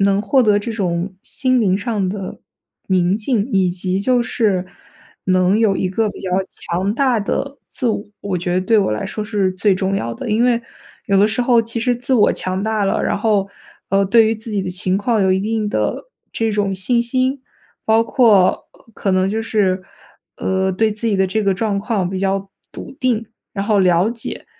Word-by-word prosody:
能 200 +1 +2
获 265 +6 +3
得 210 -2 +4
这 230 +2 -4
种 185 -2 -2
心 255 -2 0
灵 190 -3 +2
上 200 -2 -2
的 195 -1 -5 0.5
宁 185 0 +2
静， 220 -1 0
以 190 -4 +2
及 185 +1 -1
就 245 +3 +2
是 210 -5 0 0.6
能 185 +2 +3
有 210 -4 +2
一 185 - -1
个 215 +4 0
比 - - -9
较 185 - -4 0.2
强 190 +5 -3
大 255 -3 +2
的 275 +7 -3
自 250 - -2
我， 215 -2 -1 0.2
我 195 -3 -2
觉 175 +1 -2
得 185 - +2
对 220 +3 +3
我 195 - +1
来 105 - -3
说 215 - -4
是 205 -3 0
最 190 +1 +2
重 195 +1 -1
要 115 -7 -3
的。 220 - -5
因 225 +3 +2
为 235 -1 +2 0.4
有 195 -1 +3
的 205 - +5
时 220 +3 0
候 240 -1 +4
其 230 0 -3
实 245 +1 +1
自 250 +2 -1
我 215 -4 +4
强 185 +1 -3
大 215 -1 0
了， 195 - 0
然 - - 0
后， 205 -2 +1 0.4
呃， 195 0 +2
对 225 +3 +5
于 225 - +1
自 220 0 -7
己 200 -2 0
的 185 - -4
情 185 +1 0
况 215 +1 0
有 190 -1 +3
一 190 - +1
定 215 0 -1
的 - - -1 0.3
这 225 -1 -1
种 205 -2 0
信 235 +6 +1
心， 255 +2 -1 0.4
包 225 +1 +3
括， 215 -8 +3
呃， - - -23
可 195 - -1
能 185 0 +2
就 220 +2 -2
是， 195 -4 0 0.5
呃， 190 0 0
对 215 +3 +1
自 225 +2 -3
己 200 - +1
的 190 - +2
这 215 +3 -1
个 195 - +2
状 205 +1 -1
况 200 -3 -1
比 190 0 -4
较 195 0 -1 0.2
笃 - - -9
定， 235 -3 0 0.3
然 200 0 -3
后 210 -3 +3
了 180 +2 +3
解。 235 -1 -5
205 Hz, 225 characters per minute, -19 LUFS, 190-225 Hz, 0.6 s, 的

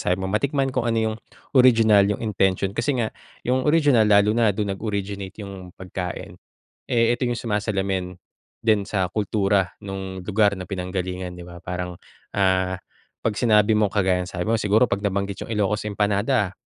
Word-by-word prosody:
sabi 90 - +1
mo, 95 - -5
matikman 135 +4 0
kung 120 -2 0
ano 115 - +1 0.2
yung - - -6 0.4
original, 115 -6 +5
yung 105 +2 -2
intention. 95 -2 +1
Kasi 135 +4 0
nga 110 - -4 0.3
yung 130 +3 +1
original 145 -8 +4
lalo 105 0 +5
na 115 -1 +3
dun 100 0 -1
nag-originate 100 -2 -4
yung 95 -2 -10
pagkain, 90 -1 -6 0.5
eh, 115 0 +3
ito 125 - -4
yung 120 -1 -1
sumasalamin 95 -4 -2 0.4
din 110 -3 +2
sa 95 -2 -1
kultura 100 -2 0
no'ng 95 -2 -6
lugar 105 0 +3
na 90 - -7
pinanggalingan, 90 0 -4
'di 90 0 -10
ba? 85 -1 -12
Parang, 90 0 -4 0.4
ah, 95 -1 +2 0.5
‘pag 110 -2 0
sinabi 110 -2 +4
mong 105 -1 +3
kagaya 95 -2 +1
sabi 90 -1 -4
mo 115 - +2
siguro 105 +3 +3
pag 100 -5 +1
nabanggit 100 -1 -2
yung - - -7
Ilocos 105 0 0
empanada, 105 +1 +1
100 Hz, 165 wpm, -23 LUFS, 95-110 Hz, 0.5 s, original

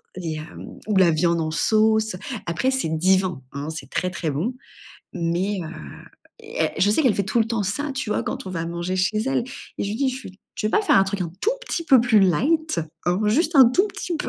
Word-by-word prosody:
et 165 -4 -4
hem 155 +1 -10
ou 210 -2 +1
la 180 -3 +5
viande 170 +1 +1
en 155 0 -2
sauce. 220 +4 +2 0.3
Après, 170 +11 0
c'est 265 -11 -1
divin, 180 -1 +1
hein, 140 +2 -5
c'est 150 -4 -7
très, 180 - -1
très 170 -4 -3
bon 185 - -2 0.6
mais 180 +3 -1
heu 160 - -6 0.7
et 450 +2 -2
je 205 - +4
sais 215 - +3
qu'elle 250 -7 +3
fait 200 - 0
tout 190 +5 0
le 225 - +3
temps 225 -2 -1
ça, 275 +9 -2
tu 265 -5 -4
vois? - - 0
Quand - - -5
on - - -5
va 165 -2 -3
manger 170 +2 -3
chez 195 +3 +1
elle, 270 -3 0 0.3
et - - -1
je - - -3
lui - - -3
dis: 275 +2 +1
«Je 255 - -5
suis 200 -7 -11 0.2
tu - - -1
veux 215 - 0
pas 430 - +2
faire 400 - +4
un 195 - +5
truc 195 0 -4
un 170 - -2
tout 440 - +2 0.2
petit 335 - -2
peu 265 -5 +6
plus 235 -2 +4
light, 295 - +2 0.3
hein? 180 +3 +1
Juste 310 +10 +2
un 260 -3 +9
tout 375 +10 +3
petit 350 -4 -4
peu?». - - -4
200 Hz, 245 wpm, -23 LUFS, 170-255 Hz, 0.7 s, un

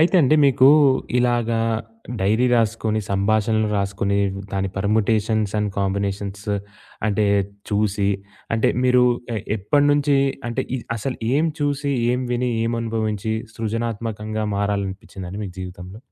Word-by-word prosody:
అయితే 170 +4 +3
అండి 150 +3 +4
మీకు 130 0 +5 0.5
ఇలాగా 120 -2 +1 0.6
డైరీ 110 +6 +2
రాసుకొని, 110 -1 0
సంభాషణలు 110 +2 +1
రాసుకొని, 100 0 0 0.3
దాన్ని 95 -1 -1
పర్ముటేషన్స్ 110 +1 +1
అండ్ 105 -1 0
కాంబినేషన్స్ 100 0 -2 0.6
అంటే 105 0 +1 0.4
చూసి, 100 -1 +1 0.5
అంటే 110 - +2 0.2
మీరు 125 0 +5 0.3
ఎ - - 0 0.2
ఎప్పటినుంచి 145 +6 +2 0.3
అంటే 115 - -1
ఇ - - -3 0.2
అసలు 125 +4 -3 0.2
ఏం 150 - +3 0.2
చూసి? 145 0 0 0.2
ఏం 125 - 0
విని? 125 +1 0
ఏం 115 +1 0
అనుభవించి? 110 -1 -2 0.2
సృజనాత్మకంగా 110 -1 -3
మారాలని 100 -1 0
అనిపించిందండి 95 0 -8
మీకు 90 - -8
జీవితంలో? 90 +2 -8
110 Hz, 120 wpm, -22 LUFS, 100-120 Hz, 0.6 s, మీకు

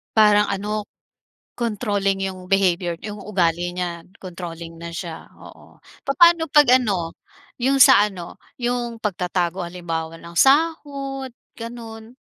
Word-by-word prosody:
Parang 210 -1 +5
ano, 205 +1 -3 0.7
controlling 205 -4 -1
'yung 185 -1 -10
behavior 180 -3 +1
'yung 210 0 -6
ugali 175 -3 -1
niya, 175 -2 -4 0.2
controlling 170 -2 -8
na 170 0 -8
siya, 165 -1 -7
oo. - - -16 0.2
Papaano 335 +4 +5
pag 295 -4 +6
ano, 190 -9 -2 0.4
'yung 270 +2 +2
sa 205 -3 +8
ano 185 -4 -8 0.2
'yung 240 -1 -2
pagtatago 180 -3 -2
halimbawa 165 -2 -5
ng 170 0 -12
sahod, 275 -3 +1 0.2
gano'n? 230 0 -9
200 Hz, 120 wpm, -22 LUFS, 175-240 Hz, 0.7 s, sa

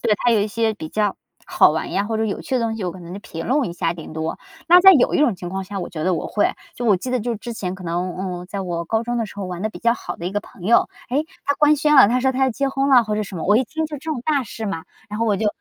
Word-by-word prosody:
对， 215 - +2
他 240 - +1
有 220 -3 +4
一 205 - +1
些 220 +1 0
比 160 -6 -7
较 210 +2 0 0.3
好 - - +4
玩 - - -3
呀， 200 - 0
或 220 +1 -2
者 220 - 0
有 205 -3 -3
趣 - - -4
的 255 - +2
东 225 -1 -1
西， 210 - -4
我 180 - -2
可 185 - -11
能 175 0 -9
就 195 - -6
评 165 -4 -7
论 270 +1 +2
一 - - -6
下 170 -1 -1
顶 160 -2 -9
多。 160 +1 -3 0.3
那 355 +1 +8
在 385 +1 +9
有 275 -9 +3
一 - - +2
种 270 -8 +3
情 175 -1 -7
况 190 +1 -4
下， 195 +1 -5
我 - - -5
觉 155 -3 -5
得 185 - +2
我 - - -4
会。 205 - +2 0.3
就 245 - -4
我 210 -4 +4
记 250 +8 -5
得 255 - +1
就 235 +1 -2
之 235 +3 -6
前 185 -5 -4
可 190 - -11
能， 175 +1 -2
嗯， 180 -1 -5
在 200 - -4
我 170 -3 -3
高 220 +6 0
中 240 +1 -2
的 230 -2 -1
时 210 - -12
候 200 - -4
玩 180 -1 -6
的 215 - -1
比 - - -11
较 235 0 +3
好 235 - -6
的 170 - -9
一 - - -2
个 205 - -1
朋 200 -3 -14
友， 230 +5 +4 0.2
诶， 280 +5 0 0.2
他 285 - +2
官 300 +1 +4
宣 300 +1 +3
了， 265 - +9
他 245 +4 +1
说 265 +1 +2
他 265 +1 +1
要 265 - +2
结 275 +4 -1
婚 270 +1 0
了 255 -3 +7
或 215 -2 -2
者 215 - -1
什 195 - -8
么， 165 - -4
我 205 +3 +4
一 260 - +2
听 315 +6 -3
就 305 -1 -6
这 305 - -10
种 255 - -4
大 290 -4 +1
事 220 0 -6
嘛。 165 -5 -4 0.2
然 210 0 -5
后 230 - +1
我 210 -2 +2
就 215 - -1
215 Hz, 370 characters per minute, -21 LUFS, 185-250 Hz, 0.3 s, 在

